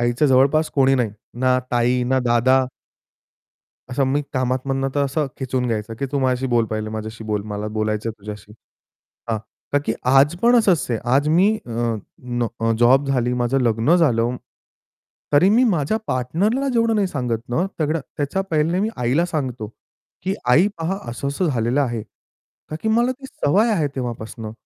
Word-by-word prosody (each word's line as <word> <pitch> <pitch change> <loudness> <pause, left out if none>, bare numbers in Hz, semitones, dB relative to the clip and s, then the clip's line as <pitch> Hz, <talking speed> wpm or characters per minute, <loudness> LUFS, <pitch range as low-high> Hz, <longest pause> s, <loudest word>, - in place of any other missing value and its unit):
आईच्या 120 +5 +2
जवळपास 140 +4 +3
कोणी 135 -1 +4
नाही. 120 -5 0 0.3
ना 130 0 +3
ताई, 125 +1 +2
ना 130 +1 +2
दादा 130 +2 +3 1.2
असं 135 +2 +1
मी 145 - +2
कामात 130 -1 -1
मधनं 135 0 0
तर 140 -1 +2
असं 140 +2 -1
खेचून 130 -1 -1
घ्यायचं, 115 -1 -3
की 140 - -2
तू 140 - +1
माझ्याशी 130 0 0
बोल 115 -1 +4
पहिले, 110 0 -3
माझ्याशी 110 0 -6
बोल. 105 -1 -2
मला 105 +1 -4
बोलायचंय 110 +1 -1
तुझ्याशी. 105 0 -9 0.8
हां, 110 - 0 0.3
का 145 - +4
की 110 - +1 0.2
आज 140 +5 +5
पण 240 +1 +5
असंच 190 -8 +3
आहे, 115 - 0 0.2
आज 145 +2 +2
मी 180 +6 +4 0.2
अ, - - -9 0.5
न 120 -2 -2
जॉब 130 +4 +4
झाली, 125 -2 +1
माझं 125 +2 +1
लग्न 115 +7 +3
झालं. 125 -7 +2 1.0
तरी 145 +6 +5
मी 235 +4 +4
माझ्या 165 +2 0
पार्टनरला 175 - 0
जेवढं 230 -1 +2
नाही 205 -3 +2
सांगत 125 -7 -3
ना, 160 +10 0
सगळं. 155 +1 0 0.2
त्याच्या 145 +7 -1
पहिले 160 +3 +1
मी 210 - +1
आईला 125 +8 +1
सांगतो, 130 -9 -3 0.6
की 190 +1 -1 0.2
"आई 160 +10 +6
पहा, 170 +4 -2
असं-असं 140 +8 -2
झालेलं 120 0 +1
आहे." 120 -5 -1 0.7
का 155 - -3
की 220 - 0
मला 235 +3 +2
ती 270 +1 -11
सवय 210 - +1
आहे 160 -7 +1
तेव्हापासनं. 115 -3 -5
130 Hz, 170 wpm, -21 LUFS, 120-155 Hz, 1.2 s, आई